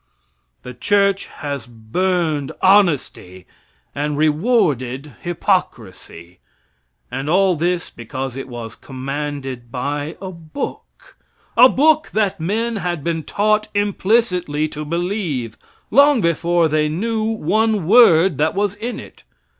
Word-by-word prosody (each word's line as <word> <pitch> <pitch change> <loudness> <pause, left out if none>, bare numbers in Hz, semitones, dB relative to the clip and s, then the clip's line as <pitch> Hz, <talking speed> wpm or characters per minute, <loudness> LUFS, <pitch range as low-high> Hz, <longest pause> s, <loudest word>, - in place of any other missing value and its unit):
The 125 - -8
church 200 +8 +1
has 140 -4 -6
burned 150 +6 -1
honesty 155 - +2 0.5
and 145 +1 -2
rewarded 150 - +1
hypocrisy. 110 - -3 0.7
And 135 +3 -4
all 185 +1 +3
this, 175 +2 -1
because 130 +2 -6
it 135 - -6
was 120 -3 -8
commanded 135 -2 -6
by 145 +4 -3
a 190 -1 -6
book 170 - -8 0.4
a 250 +2 +8
book 310 +4 +3
that 205 -4 0
men 220 +7 -1
had 175 -5 -3
been 165 0 -1
taught 215 +6 0
implicitly 195 -6 +1
to 150 +1 -6
believe, 165 - -3 0.4
long 280 +2 +5
before 170 -1 +2
they 155 0 +1
knew 220 +7 -2
one 220 -1 0
word 185 - +5
that 155 +3 +1
was 200 0 0
in 225 +4 -5
it. - - -13
165 Hz, 115 wpm, -19 LUFS, 140-205 Hz, 0.7 s, a